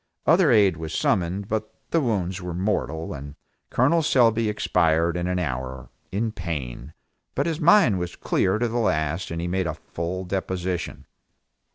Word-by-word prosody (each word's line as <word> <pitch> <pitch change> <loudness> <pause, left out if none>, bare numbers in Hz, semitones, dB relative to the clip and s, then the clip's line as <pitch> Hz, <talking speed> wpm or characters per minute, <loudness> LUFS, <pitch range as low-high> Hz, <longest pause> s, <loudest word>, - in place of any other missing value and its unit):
Other 170 0 +5
aid 100 -8 +5
was 80 -1 -5
summoned, 95 +2 0
but 110 0 -2 0.2
the 165 - +3
wounds 95 -7 -1
were 90 -1 -5
mortal, 90 -4 -1
and 70 0 -8 0.3
Col 145 +7 +3
Selby 115 -6 +3
expired 85 -4 +2
in 90 0 -1
an 90 0 0
hour, 65 -6 -4 0.2
in 110 +4 -1
pain, 75 - -5 0.4
but - - +1
his 165 -2 -1
mind 160 - +5
was 90 0 -4
clear 95 +2 +1
to 120 +2 +1
the 120 +1 -1
last 85 -5 0
and 85 - -4
he 85 - -2
made 90 0 0
a - - -3
full 90 +3 -5
deposition. 95 -1 -3
95 Hz, 165 wpm, -24 LUFS, 85-110 Hz, 0.4 s, Other